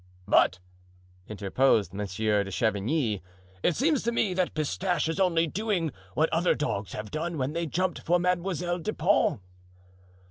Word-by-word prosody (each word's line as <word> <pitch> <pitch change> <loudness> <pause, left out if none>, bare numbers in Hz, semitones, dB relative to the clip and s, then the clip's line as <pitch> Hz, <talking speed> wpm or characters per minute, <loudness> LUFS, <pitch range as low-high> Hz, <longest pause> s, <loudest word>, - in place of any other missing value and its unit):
"But," 90 - +4 0.7
interposed 105 -1 +1
Monsieur 105 +1 0
de 95 - -7
Chavigny, 110 - 0 0.4
"it 170 - +2
seems 290 0 +2
to 235 - 0
me 210 -5 +1
that 180 -2 -1
Pistache 165 +2 0
is 165 +3 -2
only 170 -3 +3
doing 185 -2 -1 0.2
what 160 - +3
other 170 +2 +3
dogs 100 - -3
have 105 -1 -6
done 165 +1 -3
when 135 +2 -1
they 170 0 -2
jumped 180 +4 -1
for 175 +2 +2
Mademoiselle 180 0 -1
de 215 +6 -3
Pons." 175 - +2
160 Hz, 150 wpm, -27 LUFS, 110-180 Hz, 0.7 s, But